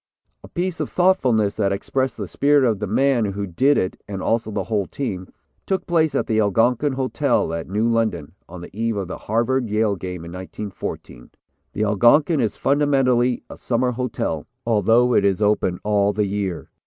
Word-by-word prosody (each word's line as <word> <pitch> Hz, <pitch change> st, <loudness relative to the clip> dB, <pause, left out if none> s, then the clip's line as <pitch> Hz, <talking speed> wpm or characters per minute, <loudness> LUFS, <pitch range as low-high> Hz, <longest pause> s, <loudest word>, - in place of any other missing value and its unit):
"A -, -, -10 dB
piece 175 Hz, -1 st, -3 dB
of 155 Hz, -, -2 dB
thoughtfulness 130 Hz, -, +2 dB
that 100 Hz, -2 st, +1 dB
expressed 130 Hz, +6 st, -2 dB
the -, -, -5 dB
spirit 145 Hz, 0 st, +3 dB
of 110 Hz, -4 st, 0 dB
the 105 Hz, -, -3 dB
man 125 Hz, +2 st, +2 dB
who 100 Hz, 0 st, -3 dB
did 130 Hz, +11 st, +2 dB
it, 95 Hz, -, -2 dB
and 100 Hz, -2 st, -5 dB
also 115 Hz, +3 st, 0 dB
the 100 Hz, -2 st, -2 dB
whole 100 Hz, 0 st, -1 dB
team, 95 Hz, -10 st, -5 dB, 0.4 s
took 190 Hz, -1 st, -1 dB
place 160 Hz, -3 st, +1 dB
at -, -, +1 dB
the 110 Hz, -3 st, 0 dB
Algonquin 115 Hz, +7 st, +2 dB
Hotel 130 Hz, -, 0 dB
at 85 Hz, +1 st, -5 dB
New 105 Hz, +4 st, 0 dB
London, 110 Hz, -10 st, 0 dB, 0.2 s
on 90 Hz, 0 st, -9 dB
the 85 Hz, -, -11 dB
eve 115 Hz, +1 st, -1 dB
of 95 Hz, -2 st, -3 dB
the -, -, -6 dB
Harvard 120 Hz, +2 st, 0 dB
Yale 105 Hz, -1 st, +1 dB
game 90 Hz, -2 st, -7 dB
in 85 Hz, -, -9 dB
1914. 95 Hz, -, -7 dB, 0.4 s
The 105 Hz, -, -1 dB
Algonquin 120 Hz, -, +4 dB
is 110 Hz, -4 st, -1 dB
fundamentally 135 Hz, -4 st, +2 dB
a -, -, -11 dB
summer 125 Hz, +1 st, 0 dB
hotel, 120 Hz, -, -3 dB, 0.2 s
although 115 Hz, +2 st, +3 dB
it 100 Hz, -, +3 dB
is 100 Hz, -1 st, +2 dB
open 105 Hz, -4 st, +1 dB
all 105 Hz, -1 st, +2 dB
the 105 Hz, 0 st, 0 dB
year. 100 Hz, -3 st, -4 dB
110 Hz, 185 wpm, -21 LUFS, 100-130 Hz, 0.4 s, Algonquin